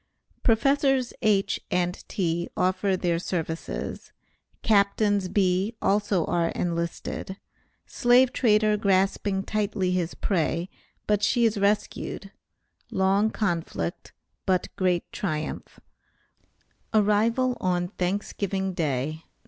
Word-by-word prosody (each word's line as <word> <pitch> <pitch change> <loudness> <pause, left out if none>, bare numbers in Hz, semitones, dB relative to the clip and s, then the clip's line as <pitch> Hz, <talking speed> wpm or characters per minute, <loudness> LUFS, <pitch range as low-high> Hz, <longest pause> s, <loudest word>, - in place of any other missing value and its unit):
PROFESSORS 270 +2 +2
H. 205 -3 +2
AND 180 0 -1
T. 170 -4 -1
OFFER 185 +1 +1
THEIR 175 -2 0
SERVICES 165 -2 -4 0.5
CAPTAINS 205 -1 +2
B. 195 +3 +1
ALSO 200 -4 +1
ARE 170 -1 +1
ENLISTED 170 +2 -3 0.5
SLAVE 245 +1 +4
TRADER 215 -3 +3
GRASPING 195 0 +1
TIGHTLY 205 -3 -1
HIS 180 -2 -1
PREY, 170 -1 -1 0.4
BUT 210 -1 +1
SHE 235 +3 +3
IS 220 -1 +1
RESCUED 200 -1 -1 0.6
LONG 195 +3 +2
CONFLICT, 170 - -3 0.4
BUT 185 -2 0
GREAT 180 -3 +1
TRIUMPH 155 -5 -4 1.2
ARRIVAL 225 +4 +2
ON 175 -1 0
THANKSGIVING 190 +1 -2
DAY, 145 -4 -1
NOV. 160 - -22
195 Hz, 100 wpm, -26 LUFS, 175-210 Hz, 1.2 s, SLAVE